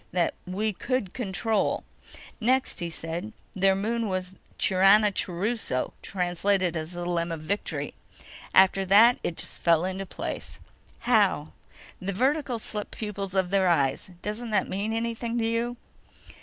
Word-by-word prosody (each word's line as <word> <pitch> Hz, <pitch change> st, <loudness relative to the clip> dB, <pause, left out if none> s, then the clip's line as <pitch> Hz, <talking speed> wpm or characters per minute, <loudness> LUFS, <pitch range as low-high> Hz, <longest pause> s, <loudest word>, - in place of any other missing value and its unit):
That, 175 Hz, -1 st, +1 dB
we 210 Hz, +4 st, -1 dB
could 235 Hz, -2 st, -2 dB
control. 220 Hz, -1 st, 0 dB, 0.6 s
Next, 255 Hz, 0 st, +1 dB
he 170 Hz, -2 st, -2 dB
said 165 Hz, +6 st, -4 dB, 0.2 s
their 195 Hz, 0 st, +3 dB
moon 225 Hz, +3 st, -1 dB
was 185 Hz, -1 st, -2 dB, 0.3 s
Chiranachuruso, 195 Hz, -, +2 dB
translated 180 Hz, 0 st, 0 dB
as 160 Hz, +2 st, -4 dB
The 175 Hz, 0 st, -4 dB
Limb 170 Hz, -1 st, -1 dB
of 165 Hz, -2 st, -4 dB
Victory. 200 Hz, +6 st, -3 dB, 0.6 s
After 190 Hz, +1 st, +5 dB
that 215 Hz, +6 st, +6 dB
it 165 Hz, -, -3 dB
just -, -, -4 dB
fell 170 Hz, 0 st, +4 dB
into 190 Hz, +1 st, -3 dB
place." -, -, -6 dB, 0.4 s
"How?" -, -, +2 dB, 0.5 s
"The 195 Hz, +2 st, -2 dB
vertical 265 Hz, +3 st, +1 dB
slit 210 Hz, -1 st, -4 dB
pupils 200 Hz, -3 st, -5 dB
of 190 Hz, -1 st, +1 dB
their 195 Hz, -1 st, +3 dB
eyes. 140 Hz, -2 st, +1 dB
Doesn't 220 Hz, +3 st, -4 dB
that 210 Hz, -3 st, +1 dB
mean 200 Hz, +3 st, -2 dB
anything 230 Hz, +1 st, -2 dB
to 230 Hz, -, +1 dB
you?" 230 Hz, +2 st, -1 dB
195 Hz, 140 wpm, -27 LUFS, 180-225 Hz, 0.6 s, that